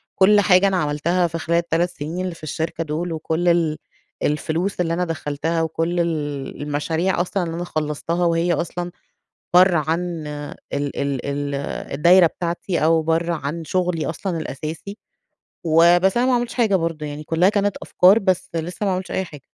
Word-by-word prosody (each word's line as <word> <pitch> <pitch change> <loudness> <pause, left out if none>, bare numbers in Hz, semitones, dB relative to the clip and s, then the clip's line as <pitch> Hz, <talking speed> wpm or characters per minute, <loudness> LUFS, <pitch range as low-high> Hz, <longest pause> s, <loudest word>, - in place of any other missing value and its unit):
كل 205 +2 +5
حاجة 195 -1 +5
أنا 190 -1 +1
عملتها 170 +3 +1
في 165 0 -4
خلال 165 +1 0
ال3 170 +1 +1
سنين 165 +1 -5
اللي 180 -2 -4
في 165 - -18
الشركة 160 +2 -3
دول 165 +3 -3
وكل 160 +2 -2
ال 165 -3 +2 0.5
الفلوس 165 +6 -1
اللي 165 -1 0
أنا 180 +1 0
دخّلتها 165 0 -2
وكل 165 +2 -1
ال 145 -6 -3
المشاريع 160 +5 0
أصلًا 185 +1 -1
اللي 165 -1 -4
أنا 175 - -3
خلّصتها 155 +1 -2
وهي 170 +1 +2
أصلًا 175 +2 -3 0.6
برّه 180 0 +6
عن 170 0 -2
ال 145 0 -6 0.4
ال 140 -2 -2
ال 140 0 -2 0.4
الدايرة 170 +5 +6
بتاعتي 170 +1 -3
أو 160 +1 +4
برّه 165 +2 0
عن 155 +1 -4
شغلي 180 -1 -1
أصلًا 170 +2 -3
الأساسي. 160 +6 -6 0.7
وبس، 175 +5 +4
أنا 245 - +3
ما 260 - +3
عملتش 240 -1 -2
حاجة 225 -5 +2
برضه 165 -3 -2
يعني، 145 +1 -6
كُلّها 165 +4 +3
كانت 205 -2 0
أفكار، 190 +5 +5
بس 185 -2 0
لسّه 175 +5 -3
ما 195 - +1
عملتش 185 0 -3
أي 190 - 0
حاجة. 150 -5 -13
170 Hz, 170 wpm, -21 LUFS, 155-180 Hz, 0.7 s, برّه